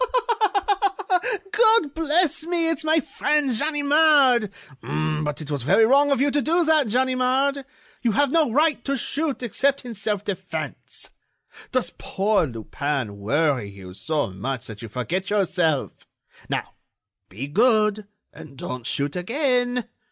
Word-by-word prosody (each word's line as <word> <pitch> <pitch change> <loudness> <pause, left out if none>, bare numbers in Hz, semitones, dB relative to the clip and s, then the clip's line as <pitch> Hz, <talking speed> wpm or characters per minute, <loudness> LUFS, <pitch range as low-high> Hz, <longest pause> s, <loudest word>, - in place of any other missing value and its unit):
"God 440 - +4
bless 325 0 +1
me! 340 -2 +1
It's 325 -1 -1
my 315 +1 +3
friend 295 0 0
Ganimard! 285 -3 +3 0.3
But 155 -1 -2
it 150 -1 -7
was 145 -2 -2
very 185 - +4
wrong 280 +4 +4
of 275 - +2
you 285 +1 +2
to 290 - +1
do 335 +4 +1
that, 310 -6 +3
Ganimard. 260 +3 +1 0.4
You 235 -3 +1
have 285 +2 +2
no 315 -6 +2
right 305 +4 +2
to 275 0 -1
shoot 285 +1 -2
except 270 +3 0
in 240 - -6
self 205 -1 -3
defense. 200 -3 -6 0.6
Does 255 -2 -1
poor 200 -3 0
Lupin 120 -1 -4
worry 135 0 0
you 95 -2 -11
so 150 +1 -2
much 125 +6 -5
that 110 -2 -9
you 115 - -8
forget 175 - -3
yourself?... 180 -8 -1 0.4
Now, - - -3 0.6
be 110 +9 -6
good, 215 - +2 0.3
and 150 -3 -13
don't 125 -2 -6
shoot 145 +3 -1
again!... 245 - 0
235 Hz, 135 wpm, -23 LUFS, -, 0.6 s, God